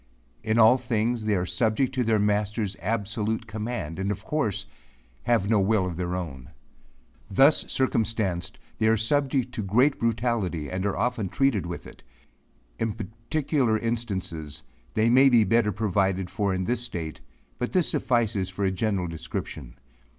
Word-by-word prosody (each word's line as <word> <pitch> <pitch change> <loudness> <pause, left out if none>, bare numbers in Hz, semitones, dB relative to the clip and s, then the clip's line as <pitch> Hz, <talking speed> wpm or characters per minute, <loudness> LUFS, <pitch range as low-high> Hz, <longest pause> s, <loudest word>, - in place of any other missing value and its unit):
In 110 +1 +1
all 115 +2 +7
things 120 -2 -1
they 105 -1 +2
are 90 -1 0
subject 115 +6 +1
to 130 -1 +1
their 110 -1 +2
master's 105 0 0
absolute 110 +2 -1
command, 105 -6 -4
and, 95 +1 -1
of 105 - -4
course, 105 -10 -1 0.6
have 115 -5 +2
no 110 -1 +3
will 100 0 +2
of 90 -2 -4
their 90 +1 -2
own. 70 -9 -6 0.8
Thus 135 +10 +4
circumstanced, 110 -8 0 0.2
they 110 - +3
are 110 0 +4
subject 130 +2 0
to 115 - -3
great 125 +9 +2
brutality, 115 - -1
and 95 +2 -1
are 100 - -2
often 110 -3 -1
treated 105 -2 +1
with 85 - -6
it. - - -13 0.8
In 115 -2 0
particular 115 +3 -1
instances, 95 -10 -4 0.3
they 110 - +3
may 130 +3 +6
be 120 -3 +5
better 105 +1 +2
provided 95 -2 0
for 100 -2 0
in 95 0 -1
this 120 +4 -1
state, 85 -10 -5 0.4
but 125 - -2
this 180 -3 +2
suffices 110 -6 0
for 95 +2 -2
a 95 - +2
general 95 -1 -1
description. 80 -6 -6
110 Hz, 160 wpm, -26 LUFS, 95-120 Hz, 0.8 s, all